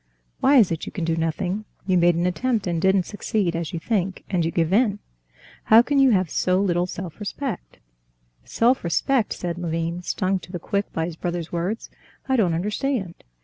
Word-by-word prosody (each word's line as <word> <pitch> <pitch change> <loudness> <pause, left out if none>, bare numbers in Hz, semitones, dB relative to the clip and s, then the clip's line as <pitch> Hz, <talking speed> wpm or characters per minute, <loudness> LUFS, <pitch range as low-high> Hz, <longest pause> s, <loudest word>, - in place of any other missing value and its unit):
"Why 275 +2 +4
is 215 -9 +5
it 165 - -3
you - - -5
can 175 -5 -3
do 165 0 +1
nothing? 175 +5 -2 0.2
You 185 -1 +2
made 175 -1 +4
an 170 +1 0
attempt 225 +4 0
and 170 -3 -1
didn't 190 0 +3
succeed, 205 -3 -2
as 165 -1 -3
you 170 - -4
think, 190 0 -2
and 180 -3 +1
you 165 - 0
give 165 +1 0
in. 210 -2 +3 0.7
How 225 +2 +7
can 285 +2 +1
you 270 -1 +6
have 190 -6 +3
so 185 0 +1
little 180 -2 +1
self 180 -1 -7
respect?" - - -5 0.7
"Self 245 +3 +2
respect!" 220 - +1
said 175 -1 -4
Levin, 165 0 -2
stung 185 +1 -1
to 180 - -13
the 180 - -3
quick 200 +4 -2
by 160 - -1
his 165 -1 -6
brother's 175 -1 -4
words; 180 +6 -3 0.4
"I 265 - +2
don't 185 -9 +2
understand. 210 +1 -2
180 Hz, 195 wpm, -23 LUFS, 170-210 Hz, 0.7 s, How